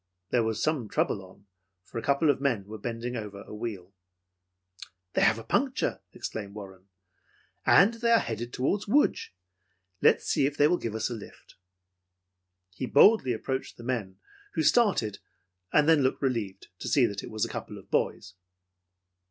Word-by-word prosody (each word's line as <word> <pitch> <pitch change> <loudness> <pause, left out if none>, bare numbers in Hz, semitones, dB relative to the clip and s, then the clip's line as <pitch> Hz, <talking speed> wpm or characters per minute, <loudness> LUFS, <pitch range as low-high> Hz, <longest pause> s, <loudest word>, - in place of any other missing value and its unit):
There 120 - +3
was 110 -1 -1
some 140 -9 0
trouble 95 - 0
on, 95 +2 -17 0.4
for 115 - -6
a - - -5
couple 140 +4 +3
of 135 - -4
men 120 -8 0
were 110 +2 -9
bending 120 +3 -4
over 105 -3 -6
a - - -11
wheel. 105 -4 -6 1.2
"They - - +1
have - - +5
had - - -8
a - - -27
puncture," - - 0
exclaimed 100 -2 -6
Warren, 95 -2 -10 0.8
"and 200 +5 +6
they 235 0 -1
are 230 - +7
headed 120 +1 -4
toward 195 +13 -1
Lodz. 285 +8 +2 0.7
Let's - - +4
see 135 - +2
if 145 - -5
they 145 - +5
will 175 - +1
give 110 -2 -4
us 110 - -2
a - - -2
lift." 110 -3 -11 1.2
He 130 - -4
boldly 170 - +5
approached 130 +3 -3
the 120 - -11
men, 110 -7 -3 0.4
who 160 - 0
started, 150 - +2 0.5
then 150 0 +5
looked 130 +1 0
relieved 110 -7 -2
to - - -6
see 135 -4 +4
that 100 -3 -3
it - - -8
was 110 -1 -1
a - - -7
couple - - -6
of - - -15
boys. 90 - -1
120 Hz, 175 wpm, -28 LUFS, 105-145 Hz, 1.2 s, are